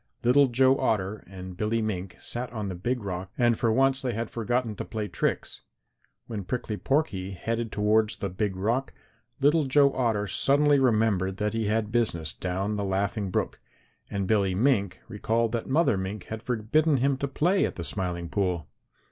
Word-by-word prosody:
Little 135 +4 +5
Joe 130 +2 +3
Otter 105 -1 0
and 95 -1 -8
Billy 110 +4 0
Mink 95 -4 -3
sat 120 0 -3
on 105 -4 -4
the - - -3
Big 120 +7 -2
Rock 95 -1 -4
and 120 -2 +3
for 115 0 +1
once 135 +3 +3
they 125 -3 -2
had 115 +1 -3
forgotten 120 0 -1
to - - -3
play 110 -2 -4
tricks. - - -2 0.6
When 105 -4 -5
Prickly 115 +1 -3
Porky 105 -8 -1
headed 115 +4 -3
towards 105 +1 +2
the 100 - -3
Big 95 +1 -2
Rock, 115 +8 -1 0.5
Little 150 +2 +4
Joe 140 +1 +4
Otter 115 -5 0
suddenly 145 +6 +3
remembered 110 -7 +2
that 105 +1 -1
he 115 -2 -1
had 110 0 0
business 85 -10 0
down 95 +3 -2
the 100 - -1
Laughing 100 +1 -1
Brook, - - -2 0.5
and 100 -1 -2
Billy 100 -2 +2
Mink 100 -4 +1
recalled 115 +2 0
that 115 +1 -3
Mother 140 - +3
Mink 95 +1 -4
had 110 0 -6
forbidden 130 +7 +1
him 135 +2 +2
to 140 - -2
play 175 +8 +2
at - - -4
the 85 - -5
Smiling 85 +1 -3
Pool. 90 -3 -1
110 Hz, 180 wpm, -27 LUFS, 95-125 Hz, 0.6 s, Little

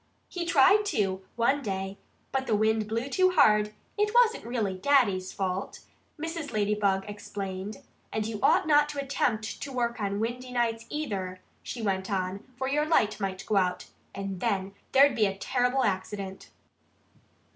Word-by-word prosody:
"He 350 -2 -4
tried 335 +7 +5
to, 195 - 0
one 265 +5 +2
day. 195 -3 -4 0.3
But 265 0 -1
the 215 - +2
wind 220 0 +2
blew 230 +4 -2
too 370 +5 +3
hard.... 210 -9 +5 0.3
It 420 +2 +1
wasn't 465 - +4
really 225 -5 -1
Daddy's 200 -5 +2
fault," 190 0 -3 0.4
Mrs. 325 -2 -4
Ladybug 205 -2 +1
explained. 200 -1 -6 0.3
"And 215 -1 -1
you 220 -1 -4
ought - - +4
not 295 -1 +4
to 290 -1 -4
attempt 245 -6 -1
to 280 - -5
work 240 -2 -1
on 200 0 -1
windy 245 +3 -3
nights, 230 -2 -1
either," 195 -11 -3 0.2
she 235 - -6
went 190 -2 -1
on. 190 0 -2
"For 265 - -2
your 295 +3 +1
light 215 -10 +2
might 195 -1 -3
go 210 - +1
out, 180 -1 0 0.3
and 195 -1 -4
then 195 -3 -1 0.2
there'd 275 -1 +6
be 215 -3 +3
a 195 0 -4
terrible 250 +4 +1
accident." 190 -1 -3
215 Hz, 160 wpm, -28 LUFS, 195-270 Hz, 0.4 s, there'd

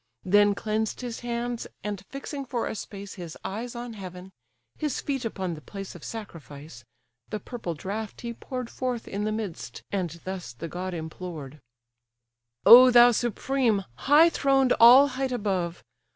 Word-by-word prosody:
Then 205 +2 +4
cleansed 215 +2 -2
his 240 -2 -5
hands; 240 0 -3 0.2
and 205 -2 -4
fixing 275 +1 -6
for 245 -3 -3
a - - -3
space 200 -2 -8
His 170 -4 -8
eyes 235 +5 -5
on 240 0 -6
heaven, 185 -2 -9 0.5
his 300 -4 -1
feet 270 -3 -3
upon 190 -5 -3
the 155 - -9
place 195 +7 -8
Of 175 - -12
sacrifice, 155 - -9 0.5
the 215 - -3
purple 210 -6 -6
draught 205 +7 -5
he 235 -1 -4
pour'd 255 +1 -6
Forth 250 -3 -3
in 205 +1 -3
the 215 - 0
midst; 215 -6 -5
and 185 -4 -1
thus 185 -10 -6
the 160 +8 -7
god 180 +2 -5
implored: 160 -3 -7 1.1
"O 250 +2 +11
thou 245 0 +8
supreme! 240 -2 0
high 295 - +5
throned 270 -4 +3
all 255 +5 +9
height 265 0 -2
above! 190 -7 -2
215 Hz, 155 wpm, -26 LUFS, 185-245 Hz, 1.1 s, O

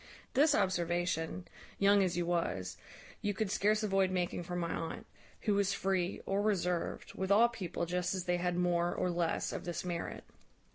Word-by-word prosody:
This 290 +2 +5
observation, 175 - 0 0.3
young 200 0 +5
as 180 -3 +1
you 175 - +1
was, 95 - -1 0.5
you 205 -1 -1
could 205 -1 -1
scarce 210 +2 +2
avoid 195 -2 +2
making 180 -1 -1
from 175 +1 -4
my 170 -1 -1
aunt, 165 0 -4 0.4
who 210 - +1
was 200 -1 +2
free, 190 -2 0
or 195 +1 0
reserved, 180 -4 -1
with 190 0 -3
all 230 +4 +6
people, 185 -7 -3
just 180 +1 -1
as 185 - -2
they 175 0 +1
had 175 0 -1
more 175 -1 +1
or 180 - 0
less 170 -1 0
of - - -4
this 175 +1 -4
merit. 175 -2 -4
180 Hz, 180 wpm, -33 LUFS, 175-200 Hz, 0.5 s, all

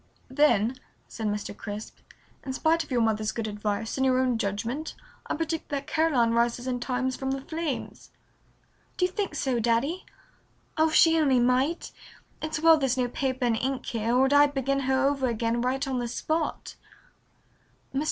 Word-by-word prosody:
"Then," 260 -4 +3 0.3
said 220 -2 -4
Mr. 205 0 -3
Crisp, 210 +1 -7 0.4
"in 265 - -4
spite 325 +4 +2
of - - -16
your 245 -3 +2
mother's 215 -1 0
good 225 -1 -3
advice 210 +2 -3
and 265 - +2
your 255 -1 +3
own 255 -3 +1
judgment 230 +9 -3 0.3
I - - -1
predict 325 0 -3
that 280 -1 -3
Caroline 300 -7 +2
rises 235 +1 +1
in 250 -1 -2
time 255 +1 -1
from 265 +1 -4
the 270 0 -2
flames." 315 -2 -5 0.9
"Do 360 - +3
you 365 - -2
think 400 +1 -3
so, 260 -4 0
Daddy? 240 +10 0 0.7
Oh, 315 0 +4
if 310 - -2
she 325 0 +6
only 270 -5 +3
might! 255 +7 +1 0.5
It's 315 0 -3
well 325 0 +6
there's 265 -2 0
no 250 -1 0
paper 260 0 -1
and 235 -2 +2
ink 265 +3 -2
here 230 +1 -1
or 265 +1 +4
I'd 285 0 +5
begin 275 +1 0
her 265 0 +2
over 275 -2 0
again 230 0 -1
right 265 +3 -1
on 260 -2 -1
the 240 - -2
spot." 315 +6 -3 1.2
Mr. 270 - 0
260 Hz, 180 wpm, -27 LUFS, 235-290 Hz, 1.2 s, she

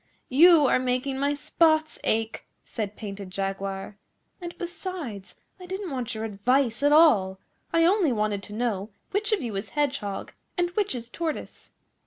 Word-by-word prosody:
'You 320 +3 +7
are 255 - +3
making 255 +1 -1
my 285 +1 +1
spots 315 +1 +2
ache,' 225 0 -1 0.2
said 210 -2 -4
Painted 200 -3 -7
Jaguar; 195 +1 -4 0.4
'and 345 -1 -7
besides, 340 - -6 0.2
I 365 - -10
didn't 380 -1 -4
want 250 -4 -3
your 220 - -4
advice 235 +4 +1
at 290 +1 +4
all. 225 - +5 0.3
I 330 0 +4
only 365 -4 +3
wanted 210 -3 0
to 210 - -10
know 215 -3 -2 0.2
which 420 +2 0
of 420 -9 +1
you 225 -4 -4
is 195 - -4
Hedgehog 275 -9 -2 0.2
and 350 0 +1
which 410 -4 -1
is 235 -1 -6
Tortoise. 315 +5 -5
255 Hz, 160 wpm, -26 LUFS, 210-330 Hz, 0.4 s, You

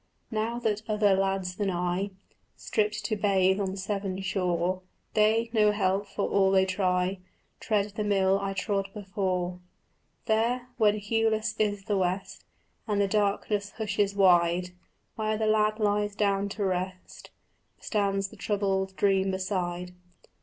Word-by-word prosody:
Now 225 +2 -1
that 220 -3 -1
other 210 -2 +3
lads 190 -1 0
than 205 -2 0
I 180 +2 -1 0.5
Strip 210 -1 0
to 215 +1 -1
bathe 190 -1 +2
on 195 -1 -2
Severn 195 -1 -3
shore, 185 -1 0 0.3
They, 225 +2 +3
no 210 -2 +4
help, 200 0 0
for 200 - -2
all 195 -1 +3
they 190 0 +4
try, 185 0 0 0.4
Tread 210 -1 0
the 210 +1 -3
mill 195 -1 +2
I 195 0 -2
trod 195 0 -1
before. 185 -3 -2 0.7
There, 240 +3 +1
when 210 -2 +4
hueless 220 +1 0
is 205 -2 0
the 205 0 0
west 185 +1 -2 0.4
And 205 -2 0
the 200 - +3
darkness 205 0 0
hushes 205 -2 0
wide, 180 -2 +4 0.5
Where 215 0 0
the 220 - 0
lad 215 0 +2
lies 205 -1 0
down 200 -1 +1
to 205 - 0
rest 185 0 -4 0.5
Stands 195 -2 0
the - - -14
troubled 195 -2 -1
dream 195 -1 +2
beside. 180 -2 -2
200 Hz, 140 wpm, -28 LUFS, 190-210 Hz, 0.7 s, no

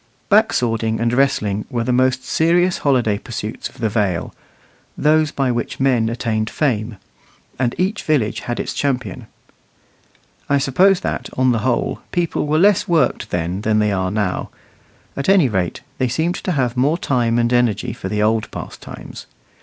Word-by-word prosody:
Back - - +5
swording 115 -2 0
and 115 0 0
wrestling 105 -6 +1
were 120 -4 -1
the 125 - 0
most 130 +1 +2
serious 175 +3 +2
holiday 120 -7 +1
pursuits 110 -2 -5
of - - -20
the 115 - 0
Vale 100 -5 -1 0.6
those 155 0 +3
by 135 -3 0
which 120 0 -3
men 125 -4 +2
attained 110 -2 -1
fame 115 -7 -1 0.6
and 125 -2 0
each 195 +4 0
village 135 -9 0
had 120 - -4
its - - -3
champion. 125 -4 -2 1.2
I 140 - +4
suppose 180 +8 +3
that, - - -3
on 130 0 +3
the 115 - +1
whole, 120 +3 -1
people 170 -3 -1
were 155 +1 +2
less 200 +3 +4
worked 170 -2 +1
then 90 +2 -2
than 110 0 +1
they 105 -1 +2
are 95 -1 0
now; 100 -2 -2 0.7
at 140 +4 -2
any 190 -7 +5
rate, 95 -6 -2 0.2
they 130 - +2
seemed 160 +8 0
to 185 - -3
have 125 -5 0
more 140 +6 +2
time 120 -7 0
and 120 0 +1
energy 120 -4 +1
for 95 - -6
the 105 +1 0
old 110 0 +1
pastimes. - - -9
125 Hz, 170 wpm, -19 LUFS, 110-145 Hz, 1.2 s, Back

